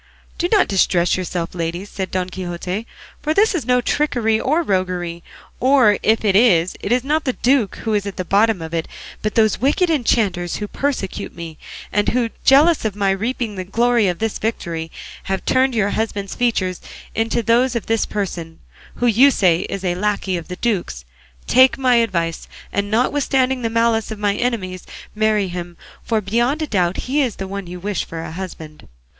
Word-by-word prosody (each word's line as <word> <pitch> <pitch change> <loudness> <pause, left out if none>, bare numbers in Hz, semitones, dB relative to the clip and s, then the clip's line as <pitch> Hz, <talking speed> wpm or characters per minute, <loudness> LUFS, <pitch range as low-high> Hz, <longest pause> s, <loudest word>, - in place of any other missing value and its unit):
"Do 350 - 0
not 415 -4 +4
distress 180 -3 +2
yourselves, 180 -2 -3
ladies," 170 +2 -3
said 190 -2 -5
Don 185 -1 -2
Quixote; 185 +4 -4 0.3
"for 310 0 -1
this 425 +2 +4
is 300 -10 -3
no 250 0 +3
trickery 240 -6 +1
or 310 +8 +1
roguery; 180 - -2 0.4
or 255 -5 +4
if 220 0 +2
it 195 -2 +3
is, 185 -6 +4
it 200 - -4
is 245 0 +2
not 305 +3 0
the 255 - 0
duke 245 -6 +1
who 220 - -1
is 205 -1 0
at 200 - -6
the 185 - -3
bottom 205 -1 +2
of 160 +1 -8
it, 165 -1 -1 0.3
but 215 - -2
those 220 -2 +3
wicked 330 +6 +2
enchanters 215 - +1
who 210 - -4
persecute 265 -6 -3
me, 165 -2 -8 0.3
and 205 0 +1
who, 240 -2 0
jealous 300 +5 +5
of 215 -3 -2
my 200 -1 +1
reaping 225 +3 -2
the 185 -2 -5
glory 235 +3 +2
of 175 -1 -1
this 225 +1 -2
victory, 170 -7 -3 0.4
have 190 0 -3
turned 260 -1 +2
your 205 -2 +1
husband's 205 -3 -2
features 195 -7 0 0.3
into 225 +1 0
those 240 +3 +2
of 235 - -2
this 225 0 0
person, 175 -5 -4 0.4
who 245 - -1
you 240 +4 +6
say 180 -10 +3
is 195 -1 -4
a 180 -2 +1
lacquey 195 0 -1
of 170 -2 -5
the 180 - -6
duke's; 180 - -2 0.4
take 260 +1 +5
my 255 -3 +3
advice, 170 -8 -1 0.3
and 200 0 -1
notwithstanding 260 +2 +1
the 230 - -1
malice 230 -1 +1
of 220 - -5
my 205 -1 +1
enemies 200 -6 -2 0.3
marry 215 -2 +1
him, 175 -1 -6 0.3
for 220 -2 0
beyond 240 +9 0
a - - 0
doubt 185 - 0
he 280 +4 +1
is 245 -7 -1
the 195 - -5
one 200 -1 -6
you 180 +1 -7
wish 200 0 -2
for 165 -1 -7
a - - -7
husband." 165 -3 -8
210 Hz, 190 wpm, -20 LUFS, 185-245 Hz, 0.4 s, you